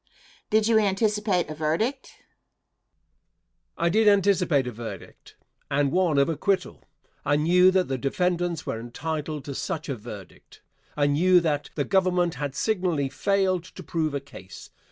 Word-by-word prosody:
Question. - - -28
Did 215 0 +3
you 225 -1 +4
anticipate 210 -2 +1
a - - -3
verdict? 165 - -2
Answer. - - -31 1.5
I 170 - +1
did 215 +4 +3
anticipate 190 -8 +3
a 125 - -4
verdict, 115 0 -10 0.3
and 140 0 +1
one 175 -4 +2
of 140 - +4
acquittal. 185 +4 -1 0.4
I 145 - +2
knew 175 +5 +5
that 185 -1 +2
the 130 -1 -3
defendants 175 +3 -1
were 110 - -3
entitled 150 +4 -5
to 140 - -5
such 155 +3 -4
a 135 - -1
verdict. 105 -4 -12 0.3
I 145 - +3
knew 175 +6 +4
that 150 -3 -1
the 145 - -1
Government 180 -3 +2
had 140 +1 -5
signally 180 -10 0
failed 190 0 0
to 185 +1 -12
prove 155 -3 -2
a - - 0
case. 115 -9 -13
170 Hz, 155 wpm, -25 LUFS, 145-185 Hz, 1.5 s, knew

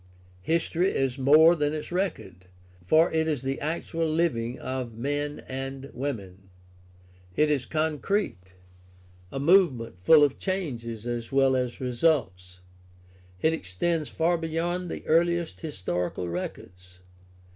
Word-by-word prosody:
History 165 - +1
is 135 -4 -1
more 155 +5 +7
than 150 -2 0
its 155 - -6
record, 95 - -3 0.4
for 155 - +4
it 160 0 +1
is 145 -5 -1
the 135 +1 -2
actual 165 +1 -2
living 130 -7 0
of 130 -3 -5
men 145 +4 -3
and 135 +1 -6
women. 100 -8 -5 0.9
It 150 0 +3
is 135 -4 0
concrete, 155 - -2 0.8
a 135 - -4
movement 140 - +3
full 150 - +6
of 140 -2 +1
changes 120 - -3
as 120 -1 -4
well 135 -1 +3
as 125 -2 -2
results. 120 - 0 0.8
It 160 - +4
extends 155 - -2
far 170 +1 +1
beyond 170 +2 -2
the - - -6
earliest 170 +1 +1
historical 90 - -3
records. 90 +1 -7
140 Hz, 125 wpm, -27 LUFS, 115-160 Hz, 0.9 s, more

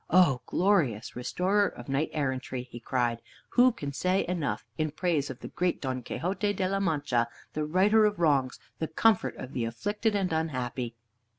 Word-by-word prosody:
"O 160 -8 +5
glorious 165 - +1
restorer 190 +11 +1
of 120 - -9
knight 140 +3 0
errantry!" 130 -3 -2
he 120 -1 -10
cried, 120 -1 0 0.3
"who 255 +1 +5
can 145 -12 -6
say 185 +6 +1
enough 170 -5 -2
in 155 -1 0
praise 155 -2 0
of 130 -1 -8
the - - -7
great 180 0 0
Don 130 -2 -3
Quixote 190 - -1
de 190 -2 0
la 195 +1 0
Mancha, 145 -10 +1 0.3
the 155 0 -1
righter 200 +7 +4
of 210 0 +1
wrongs, 140 -6 +2 0.2
the 160 - -1
comfort 220 +8 +2
of 130 +2 -8
the 125 - -1
afflicted 205 - -1
and 190 -4 0
unhappy?" 125 -6 -2
155 Hz, 175 wpm, -29 LUFS, 130-190 Hz, 0.3 s, O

